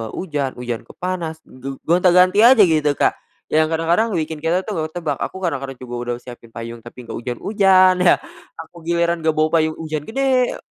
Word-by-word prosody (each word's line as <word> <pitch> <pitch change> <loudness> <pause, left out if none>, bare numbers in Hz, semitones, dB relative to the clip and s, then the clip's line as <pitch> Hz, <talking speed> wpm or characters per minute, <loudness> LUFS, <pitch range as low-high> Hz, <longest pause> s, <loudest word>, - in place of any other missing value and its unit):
ujan, 145 -7 -3
ujan 120 -2 -5
ke - - -13
panas, 170 -3 -4
ge 135 +1 -8
gonta-ganti 180 +3 +4
aja 235 -1 +7
gitu, 155 -5 +2
Kak. - - +2 0.4
Yang 155 0 +3
kadang-kadang 170 +8 +1
bikin 160 -1 -3
kita 165 +4 0
tuh 205 -5 -4
gak 155 - -1
ketebak. 155 -6 -2
Aku - - -4
kadang-kadang 135 -6 -3
juga 125 -1 -8
udah 120 0 -3
siapin 120 -2 -11
payung 115 0 -8
tapi 120 +2 -12
gak 115 - -7
ujan-ujan 185 - +3
ya, 180 - +6 0.4
aku 165 +2 -11
giliran 170 0 +1
gak 160 -1 +1
bawa 155 0 +2
payung, 155 0 0
ujan 155 -2 -4
gede. 260 +1 +1
160 Hz, 185 wpm, -20 LUFS, 135-180 Hz, 0.4 s, aja